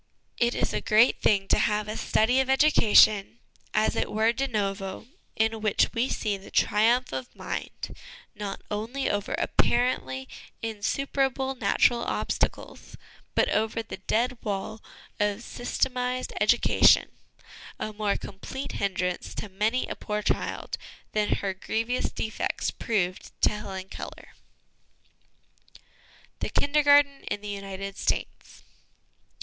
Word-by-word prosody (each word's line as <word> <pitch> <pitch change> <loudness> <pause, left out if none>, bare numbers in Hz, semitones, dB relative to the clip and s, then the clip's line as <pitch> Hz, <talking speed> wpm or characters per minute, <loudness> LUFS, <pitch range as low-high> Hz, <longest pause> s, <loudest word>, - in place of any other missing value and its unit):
It 240 0 +2
is - - -1
a - - -1
great 220 +3 +4
thing 195 -2 +3
to - - +4
have 210 0 +1
a 215 - -4
study 245 +5 +2
of 265 - +2
educa 265 -5 +4
tion 210 +1 +6 0.3
as 215 - +2
it - - -1
were 220 +2 +2
de 270 +3 -1
novo, 195 -4 -3 0.3
in 220 0 +1
which 215 -1 +2
we 240 +3 0
see 205 -2 -1
the 195 - -13
triumph 230 - +2
of 130 -2 -5
mind, - - -5 0.4
not 205 -2 -6
only 225 +6 -1
over 205 0 -2
apparently 130 - +1 0.4
insuperable 265 +4 -1
natural 240 0 +2
obstacles, - - -2 0.4
but - - +4
over 220 +2 0
the 225 - -8
dead 245 +2 0
wall 205 +1 -4 0.4
of 210 +2 0
systematised 250 +1 -2
educa - - +3
tion - - +4 0.7
a 215 - -4
more 205 -1 0
complete 235 +7 -7
hindrance 180 -2 -2
to 210 - -5
many 215 +6 0
a - - -4
poor 210 -1 -3
child - - -2 0.3
than 210 -1 0
her 195 -1 -2
grievous 225 +6 -2
defects 220 - -2
proved 190 -6 -2
to - - +6
Helen 195 -3 -6
Keller. - - -9 2.1
The - - -2
Kindergarten 285 -1 +4
in 205 - -3
the 210 - -6
United 195 -1 -6
States. - - -3
215 Hz, 130 wpm, -27 LUFS, 200-245 Hz, 2.1 s, tion